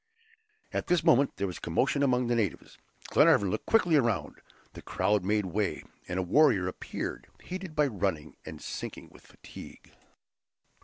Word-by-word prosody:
At - - -2
this 175 -1 +2
moment 135 +2 +3
there 100 - -1
was 90 -2 -5
a - - -30
commotion 130 - 0
among 125 -3 +2
the 120 0 +1
natives. 105 -7 -3 0.3
Glenarvan 100 -2 +4
looked 110 - -4
quickly 180 -8 +4
around; 115 -7 -1 0.3
the - - -10
crowd 105 -2 0
made 105 +1 +1
way, 90 -6 -2 0.2
and 90 - -3
a 95 - 0
warrior 100 - +4
appeared 90 - -5
heated 185 -3 -7
by 150 - +3
running, 95 - -2
and - - -9
sinking - - -7
with - - -18
fatigue. - - -13
110 Hz, 160 wpm, -29 LUFS, 95-140 Hz, 0.3 s, Glenarvan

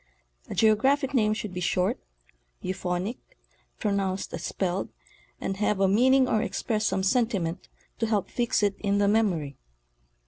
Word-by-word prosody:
A - - -5
geo 220 -1 +5
graphic 270 +4 +1
name 215 -4 +3
should 210 -3 -5
be 180 - -4
short, 180 +1 +1 0.6
euphonic, 185 +3 -3 0.6
pronounced 200 -3 -1
as - - -5
spelled, 185 0 -2 0.5
and 195 - -3
have 210 -1 +1
a 195 - +4
meaning 255 +6 +4
or 215 - +2
express 215 -2 -1
some 190 - 0
sentiment 195 -6 0 0.3
to 225 - +1
help 210 -3 0
fix 240 -3 0
it 200 -1 +2
in 200 -1 +1
the 200 0 +3
memory. 180 - +1
205 Hz, 150 wpm, -27 LUFS, 190-225 Hz, 0.6 s, geo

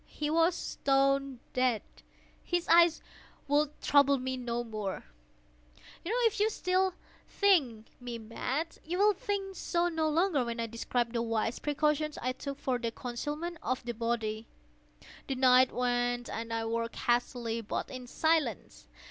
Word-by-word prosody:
He 300 0 -3
was 330 +2 +3
stone 275 -3 +1
dead. 255 -4 +1 0.6
His 350 -1 -1
eye 340 +1 +7 0.6
would 295 +1 +1
trouble 280 -1 +5
me 260 0 -3
no 240 -1 -3
more. 215 -4 -4 1.0
If 455 +2 +1
still 370 -1 +1
you 375 - -2 0.3
think 280 - +2
me 245 -1 -5
mad, 255 +8 -4
you 345 +3 -3
will 415 +2 +5
think 390 0 -3
so 345 -1 0
no 320 -2 0
longer 325 -3 +2
when 235 0 -4
I 230 - 0
describe 230 +1 -2
the 235 - 0
wise 225 0 -1
precautions 300 +1 0
I 255 - -1
took 275 +2 -6
for 260 -3 -1
the 230 -1 -1
concealment 295 +9 -5
of 255 +2 -2
the 240 - -3
body. 225 -1 -2 0.8
The 270 - -1
night 255 0 +5
waned, 245 0 0
and 230 0 -5
I 225 0 -1
worked 230 +1 -2
hastily, 240 -1 0
but 220 - -4
in 255 -1 -7
silence. 285 - 0
255 Hz, 150 wpm, -31 LUFS, 235-315 Hz, 1.0 s, eye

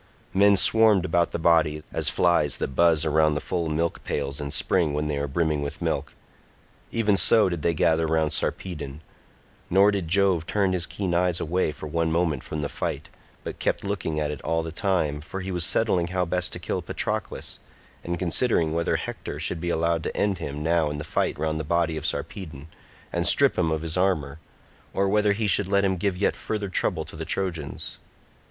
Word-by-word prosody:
Men 100 +1 +5
swarmed 110 -3 +5
about 85 -1 +2
the - - -3
body, 80 -2 +2
as - - +2
flies 85 -5 +2
that - - -2
buzz 80 -1 +4
round 75 -1 +3
the - - 0
full 85 0 -2
milk 80 +2 -1
pails 70 0 -3
in 70 - -4
spring 80 0 +1
when 75 +1 -1
they 75 - -1
are 70 0 -2
brimming 75 +1 0
with 70 0 -4
milk—even 110 -3 -4
so 105 0 +5
did 85 -3 -4
they 85 +2 +1
gather 80 +1 +2
round 80 -1 +1
Sarpedon; 75 -5 -3 0.7
nor 100 +3 +5
did 100 -5 -2
Jove 90 -2 +2
turn 100 -3 +1
his 90 -1 0
keen 95 -4 -3
eyes 90 0 +2
away 90 0 0
for 75 - -9
one 80 +1 -1
moment 85 -2 0
from 75 - -5
the - - -1
fight, - - -4 0.3
but - - -7
kept - - -1
looking 95 -6 -2
at 75 -1 -1
it 75 - -7
all 80 0 -1
the 80 - -5
time, 80 -5 0
for 95 +5 -6
he 95 +1 -5
was 90 -2 0
settling 90 -3 +2
how 90 0 -1
best 90 +1 -1
to - - -4
kill 90 +1 -3
Patroclus, 85 - -3 0.4
and 85 0 -3
considering 85 -2 +1
whether 85 +1 0
Hector - - -5
should 80 - -3
be 85 - -2
allowed 85 0 +1
to - - -5
end 100 -3 0
him 70 +1 -5
now 80 -1 +2
in 75 - -4
the 75 - -5
fight 75 - -1
round 80 +1 -1
the - - -2
body 85 +1 0
of 80 0 -3
Sarpedon, 75 -4 -5 0.4
and 85 0 0
strip 140 -1 +4
him 85 -3 +1
of 80 0 -2
his 80 +1 -2
armour, 80 -6 0 0.6
or 100 0 +2
whether 105 +1 +3
he 110 +2 -2
should 100 -1 +3
let 100 0 +2
him 95 -1 +1
give 95 0 -1
yet 100 - +1
further 105 -2 -4
trouble 90 -3 0
to - - -12
the 80 - -5
Trojans. 80 -4 -4
85 Hz, 205 wpm, -25 LUFS, 80-95 Hz, 0.7 s, Men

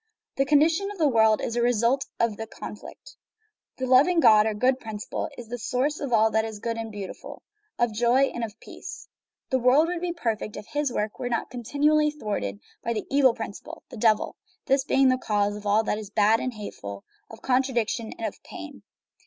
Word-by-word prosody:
The 275 - +3
condition 320 +7 +3
of 410 - -8
the 315 -4 +3
world 220 -4 +4
is - - -3
the 240 - 0
result 240 +3 +2
of 230 -2 +1
this 225 +1 -6
conflict. - - -10 0.6
The 260 - -2
loving 275 +8 +5
God, 215 -7 +6
or 215 - -1
good 255 +4 +2
principle, 215 -3 -5
is 240 - -9
the 245 +2 -5
source 270 +6 -1
of 280 -3 -4
all 220 -1 +4
that 220 +1 +2
is 220 -1 -5
good 230 +2 -3
and 225 -1 -5
beautiful, 200 -2 -8 0.3
of 240 -2 +1
joy 240 +5 +3
and 240 - -4
of 225 0 -6
peace. - - -10 0.4
The 260 - +3
world 265 +7 +4
would 350 -1 -3
be 355 -1 -1
perfect 225 -10 -3
if - - -8
His 290 -2 -1
work 210 -2 -3
were 245 - -2
not 235 - -2
continually 295 +5 +2
thwarted 205 - -4 0.2
by 235 - -1
the 215 - -3
evil 270 -4 +4
principle, 225 -4 -8
the - - -8
Devil; 215 -1 +2 0.3
this 270 0 +2
being 270 0 +3
is 260 - +6
the - - 0
cause 205 -1 +1
of 210 0 -7
all 210 +2 +3
that 210 - -1
is 210 -2 -8
bad 215 +2 +3
and 255 -2 -3
hateful, 100 - -8 0.3
of 225 - -13
contra 260 0 +1
diction 225 -1 -1
and 225 - -4
of - - -5
pain. - - -10
235 Hz, 210 wpm, -26 LUFS, 215-270 Hz, 0.6 s, God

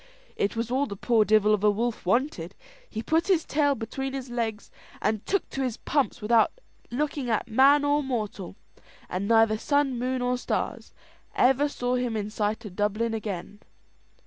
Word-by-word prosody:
It 200 - -1
was 230 +1 -2
all 275 +3 +1
the 200 - -6
poor 225 +2 +3
divel 215 0 +4
of 210 -1 0
a 210 - +6
wolf 225 -1 -2
wanted: 195 - 0 0.3
he 220 0 -5
put 325 +5 +1
his 360 -5 +2
tail 285 -1 +2
between 265 +4 -4
his 265 -2 -5
legs, 225 -3 -3 0.3
and 215 -1 -1
took 395 - 0
to 270 - -3
his 250 -3 -2
pumps 275 -5 -1
without 225 +1 +4 0.4
looking 280 0 -2
at 220 +1 0
man 275 +5 +5
or 290 +1 +2
mortal, 215 -9 -4 0.5
and 190 +2 -2
neither 225 -1 +4
sun, 285 -3 +1
moon, 255 0 -1
or 250 0 0
stars - - -3 0.4
ever 270 +3 +3
saw 245 -3 -2
him 245 -3 -1
in 210 0 -4
sight 215 +1 -2
of 190 -3 -9
Dublin 215 +3 0
again. 205 -2 -5
235 Hz, 175 wpm, -26 LUFS, 215-270 Hz, 0.5 s, a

